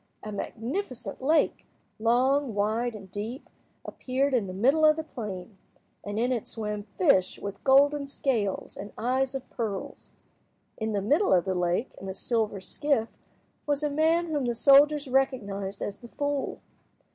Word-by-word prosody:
A 215 - -5
magnificent 245 - -4
lake—long, 260 -3 +1
wide, 220 +3 0
and 195 -3 -11
deep—appeared 255 +4 -4
in 230 -6 +1
the - - -5
middle 270 +11 +3
of 305 0 +7
the 320 - -4
plain, 200 - -7 0.4
and 205 +1 -5
in 245 +3 +1
it 240 -4 -2
swam 210 -2 -4
fish 235 - +3
with 200 -1 -7
golden 280 +1 +4
scales 230 -8 -1
and 205 - -8
eyes 260 +3 0
of 265 -1 -5
pearls. 210 -5 -5 0.6
In 220 -1 -3
the 200 -1 -1
middle 300 - +3
of 175 - +2
the 190 - 0
lake, 180 +6 0
in 195 - -6
a 190 - -5
silver 220 -2 -1
skiff, 230 +4 0 0.6
was 290 0 0
a 295 - 0
man 320 +3 +3
whom 300 -5 -1
the 240 -1 0
soldiers 285 +3 +5
recognised 205 -7 -1
as 200 - -5
the 240 - -11
fool. 285 +2 -3
240 Hz, 155 wpm, -27 LUFS, 205-280 Hz, 0.6 s, of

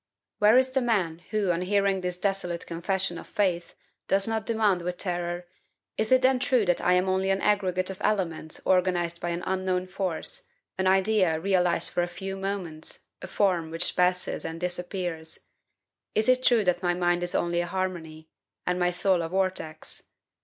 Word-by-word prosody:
Where 210 +3 +6
is 260 0 +3
the 265 0 +1
man 190 -9 0
who, 210 -4 +1
on 170 0 -1
hearing 195 0 +1
this 180 -1 -2
desolate 180 -3 -2
confession 175 +1 -2
of - - -11
faith, 180 -4 -1 0.3
does 195 +1 +2
not 220 -1 -2
demand 215 -5 +2
with 175 +1 -3
terror, 175 -1 -3 0.5
"Is 220 +2 -1
it 255 0 +5
then 260 0 +4
true 250 -4 +2
that 175 -1 +1
I 180 - +3
am 180 +1 +2
only 190 +1 +1
an 195 0 +2
aggregate 185 -3 +1
of 190 - -10
elements 165 -6 -1
organized 175 -2 +1
by 175 - -2
an 170 +1 -3
unknown 185 -1 0
force, 185 -3 -4 0.3
an 190 - +2
idea 190 -3 +3
realized 180 -1 +1
for 175 - +2
a 175 - 0
few 195 +2 -6
moments, 190 -5 -5 0.2
a - - -6
form 180 -6 +1
which 165 +2 -1
passes 180 0 +1
and 165 0 -5
disappears? 175 -2 -3 0.7
Is 215 - +2
it 255 0 +4
true 240 -4 +4
that 180 -2 +1
my 175 -1 +1
mind 175 0 +1
is 175 0 -3
only 170 0 +1
a 175 - -3
harmony, 170 -4 -4 0.4
and 180 0 0
my 180 0 +3
soul 180 0 +2
a 165 - -3
vortex? 185 -4 -3
185 Hz, 180 wpm, -27 LUFS, 175-195 Hz, 0.7 s, Where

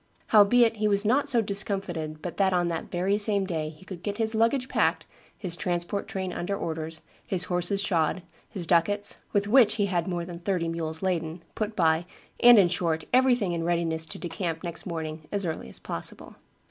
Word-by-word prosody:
Howbeit 225 +2 +5
he 215 0 +1
was 200 0 +2
not 275 +6 +2
so 235 -4 +3
discomfited 190 -6 -3
but 175 - -5
that 195 -1 +3
on 175 -1 +1
that 165 -1 -4
very 190 +4 0
same 205 -2 +1
day 160 -4 -3
he 155 +4 -15
could 185 -3 -8
get 205 +1 -4
his 220 0 0
luggage 230 +4 +2
packed, - - +1 0.3
his 180 -5 -4
transport 175 +3 -2
train 190 -2 -4
under 200 +3 -3
orders, 160 -1 -4 0.2
his 185 -2 0
horses 180 +2 +1
shod, 170 -2 0 0.3
his 185 -4 -3
ducats, 200 +5 +1
with 205 0 +1
which 230 -1 +5
he 205 - +1
had 180 -3 -1
more 175 -2 -2
than 170 -1 -8
thirty 175 -2 -1
mules 160 0 -3
laden, 165 -2 -2
put 215 0 -3
by, 165 -1 +2 0.3
and, 240 -1 +8
in 195 -3 +6
short, 165 -2 -1
everything 250 -7 +3
in 170 -1 -2
readiness 165 -1 0
to - - -7
decamp 165 -1 -4
next 170 0 -5
morning 160 -2 -5
as 200 -2 -1
early 160 - -4
as - - -5
possible." - - -5
180 Hz, 195 wpm, -27 LUFS, 165-205 Hz, 0.3 s, and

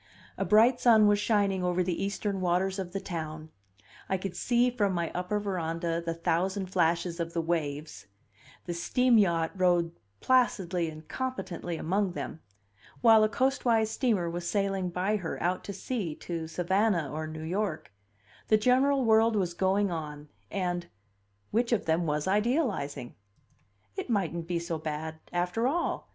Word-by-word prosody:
A - - -1
bright 230 +4 +5
sun 220 -3 +6
was 205 0 +4
shining 200 -3 +1
over 180 0 +1
the 175 0 -2
eastern 200 0 -2
waters 185 +2 +1
of 180 -2 -4
the 195 - -3
town, 155 -3 -6 0.6
I 190 - +1
could 185 -1 -5
see 245 +3 +2
from 205 -5 0
my 170 -2 -1
upper 180 +4 -1
veranda 170 -4 -2
the 165 0 -3
thousand 185 +3 -1
flashes 170 -1 +1
of 170 0 -3
the 170 - -1
waves; 150 -9 -3 0.6
the 175 - -3
steam 240 +7 +3
yacht 170 -5 +2
rode 175 -2 +2 0.3
placidly 190 -10 +2
and 155 0 -11
competently 190 -10 -4
among 190 +3 0
them, 160 - -5 0.6
while 225 -2 +7
a 215 - +3
coastwise 240 -3 +1
steamer 220 -11 +1
was 170 +1 -3
sailing 195 -2 0
by 185 +4 0
her, 175 -5 -5
out 180 +2 -1
to - - -4
sea, 195 -4 -3
to 165 -1 -5
Savannah, 180 -1 +1
or 155 +1 -3
New 155 0 -7
York; 180 - -2 0.6
the 215 - +5
general 260 +4 +3
world 225 0 +4
was 180 -4 0
going 190 +2 +1
on, 150 -2 -6 0.2
and 175 -2 -2 0.6
which 235 +2 +1
of 235 - +1
them 165 +1 +1
was 150 +1 -1
idealizing? 205 - 0 0.8
It - - -5
mightn't 170 -6 -1
be 175 -1 -1
so 170 -1 -3
bad, 160 +1 -5
after 180 +7 0
all. 340 +6 -1
180 Hz, 160 wpm, -29 LUFS, 165-210 Hz, 0.8 s, while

